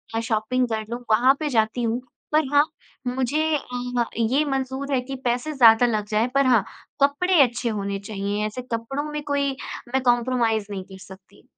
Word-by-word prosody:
अ, - - +1
shopping 230 +2 0
कर 220 -1 -2
लूँ, 240 - -4
वहाँ 245 +5 +5
पे 305 - -1
जाती 225 -1 +1
हूँ। 235 +2 -1 0.3
पर 310 -1 +4
हाँ, 290 +1 +6 0.4
मुझे 260 +5 0
अ, 245 -2 -3
ये 250 +6 +2
मंज़ूर 270 0 -2
है 255 - +2
कि 270 +2 -6
पैसे 250 +6 0
ज़्यादा 235 -2 +6
लग 215 -3 0
जाएँ, 215 +3 +2
पर 275 -1 +4
हाँ, 240 -6 +4 0.4
कपड़े 330 +4 +3
अच्छे 240 -1 -1
होने 200 -2 -3
चाहिए। 205 +1 -3
ऐसे 215 +4 -6
कपड़ों 270 +6 -3
में 300 0 -3
कोई 280 -1 0 0.4
मैं 265 - +2
कॉम्प्रोमाइज़ 240 -3 +1
नहीं 190 -2 -4
कर 190 - -12
सकती। 190 +1 -16
245 Hz, 180 wpm, -23 LUFS, 220-270 Hz, 0.4 s, हाँ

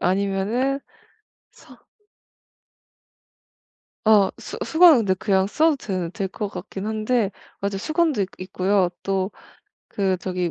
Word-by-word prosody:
아니면은 200 +9 0 0.7
서 - - -18 2.2
어 210 -3 +5
수 - - -8
수건은 330 -4 +7
근데 195 -4 +1
그냥 190 0 +1
써도 310 +7 +2
될 185 -8 -4
될 195 -1 -3
것 205 +2 -4
같긴 190 +2 -7
한데 220 0 0 0.3
맞아 200 0 -2
수건도 310 - +1
있 190 - -3
있고요 185 0 +1
또 195 0 -1 0.6
그 190 -2 0
저기 180 -1 -2
200 Hz, 205 characters per minute, -23 LUFS, 190-225 Hz, 2.2 s, 수건은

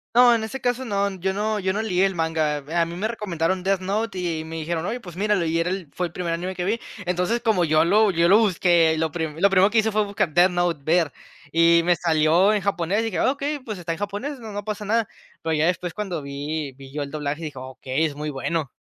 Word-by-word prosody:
No, 245 -1 +7
en 220 -1 0
ese 265 +3 -6
caso 245 +1 -1
no, 200 -3 0
yo 190 +2 -1
no 210 +1 -1
yo 190 0 0
no 215 - -1
leí 190 -3 +2
el 190 -2 -1
Manga. 160 -3 0 0.2
A - - +3
mí 170 +1 -7
me 215 +5 -2
recomendaron 185 -5 -2
Death 195 0 +1
Note 205 +1 -2
y 165 -3 -2
me 165 0 -7
dijeron: 165 +1 -3
"Oye, 245 +5 -3
pues 175 -4 -11
míralo", 205 -3 +1
y 165 +1 0
era 170 - 0
el 185 -5 -4
fue 180 - -1
el 170 - -16
primer 175 -1 -3
anime 180 +3 -3
que 180 - -3
vi. 215 +6 0 0.3
Entonces, 180 +6 0
como 215 -7 +2
yo 155 +1 +4
lo 205 +4 +4
yo 170 0 +2
lo 205 - +7
busqué 175 -5 +3
lo 160 -1 0
pri 160 -1 -4
lo 200 - +6
primero 195 +1 +5
que 225 +1 +3
hizo 220 0 +1
fue 215 0 +1
buscar 195 -6 -1
Death 175 +1 +5
Note 175 -3 0
ver, 165 -1 +2 0.4
y 170 +1 +5
me 175 0 +3
salió 165 +4 +3
en 210 - 0
japonés 195 +1 0
y 225 - -2
dije: 215 -6 -3
"Ah, - - +3
okey, 285 +1 -3
pues, 220 -6 -6
está 170 -1 -4
en 165 - -3
japonés, 210 +8 -4
no 220 -2 -8
no 205 0 -4
pasa 210 0 -4
nada". 225 +2 +1 0.4
Pero 160 0 -1
ya 155 +1 +2
después 175 -1 -1
cuando 190 -7 -4
vi 140 +1 -4
vi 135 0 -12
yo 150 - -2
el 140 - -8
doblaje, 150 +1 -3
dije: 145 -4 -6
"Okey, 130 +3 -2
es 145 -2 -3
muy 150 +1 -4
bueno". 145 +1 -2
180 Hz, 260 wpm, -23 LUFS, 160-205 Hz, 0.4 s, No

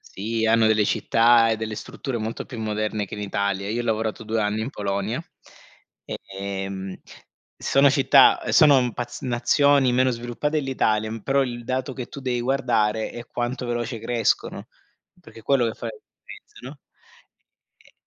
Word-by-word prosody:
Sì, 115 +3 -3
hanno 115 0 +4
delle 110 -1 +3
città, 115 +2 +4
e 110 - +1
delle 110 0 -4
strutture 125 +3 -5
molto 110 +1 -4
più 120 - -9
moderne 110 -1 -2
che - - -8
in 105 - -7
Italia. 100 -1 -2
Io 115 +3 -1
ho 120 - -3
lavorato 110 -1 -1
2 110 0 -1
anni 105 +1 -1
in 115 +5 -3
Polonia, 100 +3 -2 0.8
ehm, 95 -1 -6 0.6
sono 140 +1 +3
città 135 0 +5
uhm, - - -2
sono 130 -6 +5
paz 120 +2 -6
nazioni 130 +2 +3
meno 130 +1 +3
sviluppate 120 +6 -2
dell'Italia, 110 -6 0
però 135 +3 +2
il 120 -2 -5
dato 130 +2 -2
che 125 -2 -6
tu 140 - -10
devi 125 -2 -1
guardare, 115 -5 0
è 120 0 -9
quanto 120 +1 -3
veloce 120 0 -3
crescono, 115 -1 -1 0.5
perché 115 - -14
è - - -20
quello 130 0 +2
che 115 - -3
fa 115 - -6
differenza, 110 -1 -14
no. 135 +4 -9 1.1
E - - -23
115 Hz, 165 wpm, -23 LUFS, 110-130 Hz, 1.1 s, città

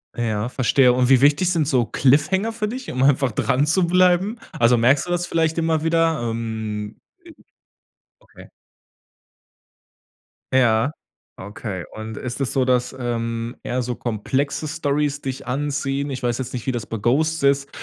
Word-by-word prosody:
Ja, 115 -1 -2
verstehe. 130 0 +3
Und 125 0 +2
wie 130 -2 +5
wichtig 145 +6 +3
sind 160 -5 +1
so 125 -5 +2
Cliffhanger 155 - +2
für 220 -2 -2
dich, 255 +4 -6
um 130 +1 -1
einfach 135 -2 +3
dranzubleiben? 180 - +2 0.2
Also, 120 +1 +4
merkst 130 +5 +3
du - - -9
das 175 0 -1
vielleicht 165 -1 0
immer 160 -1 0
wieder? 165 -2 +1
Ähm, 110 -2 -4 1.3
i - - -26
okay. - - -15 2.1
Ja, 120 +2 +3 0.4
okay. 100 -1 -6
Und 110 0 -7
ist 125 +3 -5
es 135 -3 -1
so, 135 - +2
dass, 125 0 0
ähm, 115 -1 -3
eher 125 +1 -2
so 125 0 -3
komplexe 135 +7 -2
Storys 145 -1 -1
dich 130 -1 -5
anziehen? 140 +1 -2
Ich 130 -2 -5
weiß 120 -1 0
jetzt 130 -1 -5
nicht, 120 -3 -5
wie - - +2
das 120 -3 -4
bei 115 - -5
„Ghosts“ 150 +8 +1
ist. 140 0 +2
135 Hz, 155 wpm, -21 LUFS, 120-155 Hz, 2.1 s, wie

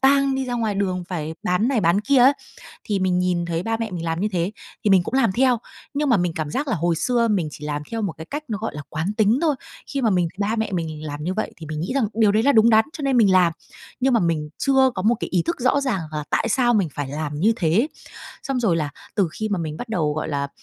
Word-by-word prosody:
tang 275 0 +4
đi 265 - -1
ra 245 -1 -3
ngoài 225 -4 -1
đường, 185 -2 -1
phải 160 -3 -4
bán 180 +7 +1
này 255 -6 +1
bán 170 +3 +3
kia 270 +4 +3
á. 255 +3 +7 0.5
Thì 205 -2 -1
mình 185 -1 +1
nhìn 180 -1 0
thấy 170 0 -2
ba 225 +1 -1
mẹ 225 -2 -4
mình 170 -2 -4
làm 165 0 -1
như 210 - +1
thế, 175 +1 -1 0.3
thì 210 - +2
mình 185 -3 +5
cũng - - -6
làm 260 -7 +3
theo, 250 +3 +3 0.4
nhưng 290 0 0
mà 235 - +5
mình 175 -2 0
cảm 155 -2 -3
giác 285 - -2
là 250 - 0
hồi 170 0 +1
xưa 235 +7 +1
mình 190 -7 +1
chỉ 150 - -9
làm 150 0 -2
theo 225 -1 -2
một 195 -6 -2
cái 160 - -8
cách 295 - -5
nó, 215 -4 -2
gọi 220 -3 -4
là, 150 - -5
quán 160 +7 -2
tính 220 +4 +3
thôi. 310 -4 +2 0.3
Khi 275 - -3
mà 230 - +3
mình 180 -3 +2
thì - - -32
ba 215 +3 0
mẹ 220 -2 -2
mình 160 -3 -4
làm 145 0 -5
như 180 +4 -1
vậy 215 - -3
thì 160 - -9
mình 155 0 -5
nghĩ 175 +11 -3
rằng 260 -6 +2
điều 215 -2 +4
đấy 220 +2 +2
là 285 - +5
đúng 225 -2 +5
đắn 220 -1 +5
cho 310 - -7
nên 275 -2 +1
mình 205 -5 +5
làm, 180 -2 +5 0.5
nhưng 265 +1 +2
mà 235 - +4
mình 160 -4 0
chưa 265 -1 +4
có 185 - -2
một 225 +5 +3
cái - - -3
ý 180 - +3
thức 335 - -2
rõ 260 +3 +2
ràng 240 -10 -1
là 150 -1 -3
tại 230 - +1
sao 240 -2 +3
mình 195 -8 +2
phải 145 -2 -3
làm 150 -1 -3
như 220 +6 +4
thế 160 -6 0
ấy, 235 - +2 0.5
xong 270 -3 -2
rồi 200 -8 +2
là 150 -3 -1 0.2
từ 195 -5 +2
khi 215 - -3
mà 200 -4 -1
mình 155 -2 -4
bắt 245 - -7
đầu, 155 -9 0
gọi 155 - -3
là, 140 -2 -2
200 Hz, 295 wpm, -22 LUFS, 170-240 Hz, 0.5 s, á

